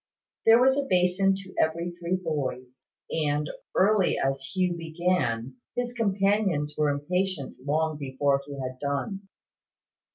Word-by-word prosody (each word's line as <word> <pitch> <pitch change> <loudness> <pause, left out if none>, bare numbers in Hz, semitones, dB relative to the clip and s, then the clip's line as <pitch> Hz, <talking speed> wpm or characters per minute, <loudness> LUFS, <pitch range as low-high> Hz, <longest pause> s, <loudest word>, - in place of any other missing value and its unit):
There 225 +1 +8
was 265 +1 +5
a 280 -1 -1
basin 185 +2 +3
to 190 -1 -9
every 170 +2 +1
three 175 +1 -2
boys; 135 -7 -4 0.2
and, 150 -1 0 0.3
early 200 -1 +3
as 135 0 0
Hugh 180 +6 0
began, 160 -8 -1 0.2
his 245 0 -1
companions 195 -8 +1
were 150 -1 +2
impatient 155 +1 -1
long 155 +2 0
before 140 0 +1
he 145 - -7
had 130 -1 -5
done. 170 - -3
165 Hz, 130 wpm, -27 LUFS, 140-190 Hz, 0.3 s, There